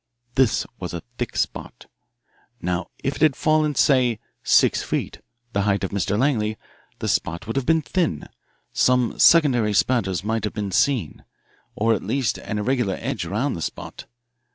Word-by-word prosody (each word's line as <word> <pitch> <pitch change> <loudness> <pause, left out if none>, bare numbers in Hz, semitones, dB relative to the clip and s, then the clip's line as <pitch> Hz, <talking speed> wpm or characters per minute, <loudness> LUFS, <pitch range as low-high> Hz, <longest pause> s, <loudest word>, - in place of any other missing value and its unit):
This 130 -4 +2
was - - -5
a - - -6 0.2
thick - - -3
spot. - - -3 0.7
Now 90 +1 -2
if 135 +2 -1
it - - -12
had 155 -4 +4
fallen, 155 -2 +2
say, 125 -5 +3 0.2
six - - +4
feet, - - -3 0.3
the 100 - +1
height 100 -1 +1
of 95 - -2
Mr. 100 0 -1
Langley, 110 -5 +1 0.4
the - - -4
spot 85 +5 -1
would 115 - -4
have 135 -2 -1
been 160 -1 +3
thin 155 - -1 0.5
some 125 -2 +2
secondary 125 -10 +5
spatters 95 -5 +1
might 110 +1 -1
have 105 - -3
been 105 -2 -3
seen, 110 - 0 0.5
or 115 +2 +2
at 105 - -1
least 135 -4 -1
an 105 - -4
irregular 110 -3 0
edge - - -3
around 125 +8 -1
the 85 - -5
spot. - - -6
115 Hz, 165 wpm, -23 LUFS, 100-135 Hz, 0.7 s, secondary